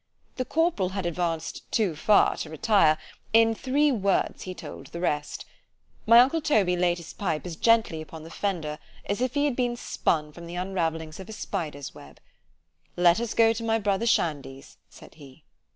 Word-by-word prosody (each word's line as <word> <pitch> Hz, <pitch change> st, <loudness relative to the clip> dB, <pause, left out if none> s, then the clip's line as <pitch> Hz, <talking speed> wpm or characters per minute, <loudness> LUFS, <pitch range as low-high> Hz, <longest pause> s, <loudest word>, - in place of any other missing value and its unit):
The 255 Hz, -, -1 dB
corporal 315 Hz, -, +1 dB
had 190 Hz, -1 st, -4 dB
advanced 170 Hz, -1 st, -3 dB
too 200 Hz, -8 st, +1 dB
far 200 Hz, +7 st, +4 dB
to 155 Hz, -, -5 dB
retire——in 210 Hz, +5 st, +2 dB
three 280 Hz, +5 st, +1 dB
words 200 Hz, -6 st, 0 dB
he 185 Hz, -1 st, -6 dB
told 145 Hz, -4 st, -9 dB
the 170 Hz, -, -8 dB
rest—— 150 Hz, -4 st, -2 dB, 0.6 s
My 230 Hz, +1 st, +8 dB
uncle 275 Hz, +6 st, +2 dB
Toby 210 Hz, -, +2 dB
laid 175 Hz, -1 st, +2 dB
down 170 Hz, -, -9 dB
his -, -, -10 dB
pipe 165 Hz, -6 st, -3 dB
as 175 Hz, -2 st, -5 dB
gently 225 Hz, -5 st, +2 dB
upon 155 Hz, 0 st, -10 dB
the 165 Hz, -, -11 dB
fender, 165 Hz, -7 st, -3 dB, 0.3 s
as 205 Hz, +4 st, -2 dB
if 255 Hz, +3 st, -1 dB
it 285 Hz, -, +2 dB
had 290 Hz, -4 st, +1 dB
been 245 Hz, -1 st, 0 dB
spun 150 Hz, -9 st, -1 dB
from 170 Hz, +2 st, -11 dB
the 170 Hz, -, -7 dB
unravellings 165 Hz, -4 st, -3 dB
of 190 Hz, -, -9 dB
a -, -, -7 dB
spider's 150 Hz, -8 st, -5 dB
web—— 70 Hz, 0 st, -14 dB, 0.8 s
——Let 175 Hz, +1 st, +5 dB
us 235 Hz, -1 st, -3 dB
go 225 Hz, 0 st, +5 dB
to 230 Hz, +1 st, -6 dB
my 225 Hz, 0 st, +1 dB
brother 205 Hz, +1 st, 0 dB
Shandy's, 140 Hz, -, -1 dB
said -, -, -15 dB
he. 140 Hz, -4 st, -16 dB
180 Hz, 185 wpm, -26 LUFS, 160-225 Hz, 0.8 s, My